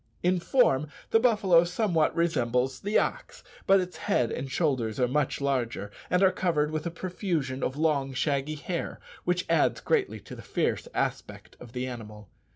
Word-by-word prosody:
In 180 +1 +3
form 170 - +3 0.2
the 225 - +5
buffalo 200 -8 +4
somewhat 175 -3 +1
resembles 130 -6 +1
the 205 +2 +1
ox, - - -2 0.2
but 195 0 +6
its 180 -1 -4
head 125 - +1
and 135 - -4
shoulders 130 -9 0
are 125 - +3
much 140 +2 0
larger, 125 -7 -1 0.2
and 180 +2 +3
are 190 - +6
covered 160 -5 0
with 155 +1 -2
a - - 0
profusion 165 -7 -3
of 130 - -2
long 150 -4 +1
shaggy 140 +2 -1
hair 170 +3 -4 0.3
which 180 0 0
adds - - +2
greatly 450 -5 0
to - - -10
the - - -10
fierce - - -1
aspect - - -3
of 120 -1 -12
the 125 0 -2
animal. 105 -5 -8
155 Hz, 170 wpm, -28 LUFS, 130-180 Hz, 0.3 s, but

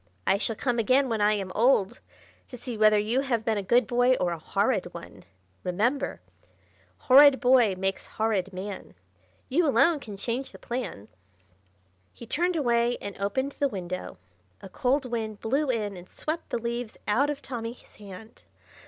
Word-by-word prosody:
"I 195 - +2
shall 225 +1 -1
come 245 +1 -1
again 255 +4 +3
when 225 -2 -1
I 210 +1 +4
am 195 -3 -3
old 225 -4 +2 0.5
to 250 - -10
see 245 0 -6
whether 215 0 +5
you 220 +6 +1
have 235 -5 -1
been 220 -2 +1
a - - -2
good 235 +6 +3
boy 245 +1 +3
or 180 -7 -1
a 170 - -4
horrid - - 0
one. - - -11 0.4
Remember, 235 +10 -1 0.8
"Horrid 275 +1 +7
boy 245 -6 +4
makes 190 +1 -3
horrid 210 -4 -1
man; 190 - -7 0.5
You 320 +5 +2
alone 315 +3 +3
can 210 -7 -9
change 240 +6 -3
the - - -10
plan." 240 - -5 1.1
He 235 - -11
turned 350 +9 0
away 240 -4 +1
and 200 -1 -7
opened 260 +8 -1
the 280 - 0
window. 185 -4 -6 0.4
A - - -11
cold 270 +1 0
wind 220 -4 -4
blew 275 +5 0
in 210 -5 -1
and 180 0 -12
swept 320 +2 -5
the - - -1
leaves 235 0 -4
out 265 +8 +2
of 290 -1 -4
Tommy's 235 -2 -6
hand. 205 +1 -12
235 Hz, 170 wpm, -27 LUFS, 205-260 Hz, 1.1 s, Horrid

